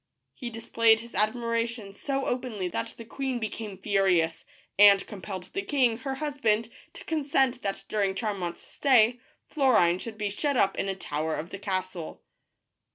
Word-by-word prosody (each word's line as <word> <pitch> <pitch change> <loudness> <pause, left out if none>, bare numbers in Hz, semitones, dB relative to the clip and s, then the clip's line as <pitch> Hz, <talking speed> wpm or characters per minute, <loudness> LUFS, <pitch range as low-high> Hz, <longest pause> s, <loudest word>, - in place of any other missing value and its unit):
He 245 - -6
displayed 225 -1 +3
his 235 0 -12
admiration 230 0 -1
so 275 +5 -2
openly 245 -7 -2
that 115 -9 -4
the 230 - -9
queen 265 +2 -3
became 215 -3 -5
furious, 190 -4 +1 0.3
and 200 -1 +8
compelled 190 -3 -7
the 390 - -1
king, 255 -9 +1
her 270 0 -3
husband, 245 -7 0 0.2
to - - -11
consent 270 -5 +1
that 195 -1 -3
during 200 -2 0
Charmant's 195 -5 -3
stay 245 -3 +3 0.3
Florine 250 - +3
should 220 +2 -7
be 210 -1 -2
shut 285 +6 0
up 195 -3 +3
in 195 - -2
a 195 - -1
tower 155 -3 -2
of 165 +4 -6
the 195 - -6
castle. 185 -4 -4
220 Hz, 160 wpm, -28 LUFS, 195-245 Hz, 0.3 s, and